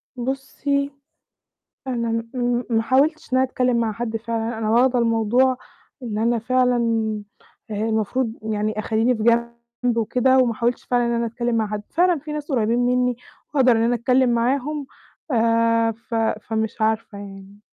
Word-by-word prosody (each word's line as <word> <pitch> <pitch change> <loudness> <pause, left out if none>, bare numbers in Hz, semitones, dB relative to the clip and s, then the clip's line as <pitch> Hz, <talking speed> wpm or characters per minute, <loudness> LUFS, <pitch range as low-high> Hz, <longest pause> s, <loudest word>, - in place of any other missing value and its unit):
بُصي، 275 +2 -2 1.0
أنا 235 -2 -1
م 230 0 -3
م 245 0 0
ما 225 -1 +2
حاولتش 280 +4 +1
إن 255 - +4
أنا 260 - +4
أتكلم 250 -1 +1
مع 225 -2 0
حد 225 +1 -3
فعلًا، 225 0 -3
أنا 215 -1 -2
واخدة 245 +2 +3
الموضوع 235 +3 +2 0.5
إن 215 -3 -4
أنا 235 +1 +1
فعلًا 250 +1 +2 0.9
المفروض 220 +3 -1 0.2
يعني 215 +1 -1
أخلّيني 225 +3 +1
في 215 - -4
جنب 235 +1 0
وكده، 250 +3 +2
وما 250 -2 +4
أحاولش 235 +2 -1
فعلًا 245 -1 +1
إن 235 - 0
أنا 235 0 0
أتكلم 235 +1 -2
مع 220 -2 +1
حد. 210 0 -4
فعلًا 350 -2 +2
في 300 +2 -8
ناس 300 0 -5
قريّبين 230 -1 +1
مني، 250 0 +2 0.4
وأقدر 260 -4 +4
إن 225 -1 +3
أنا 240 +1 +2
أتكلم 250 +2 +2
معاهم، 265 +4 0 0.4
آآ، 230 0 +3
ف 230 +1 -8 0.3
فمش 220 0 -3
عارفة 220 -1 0
يعني. 195 0 -11
235 Hz, 160 wpm, -22 LUFS, 225-255 Hz, 1.0 s, إن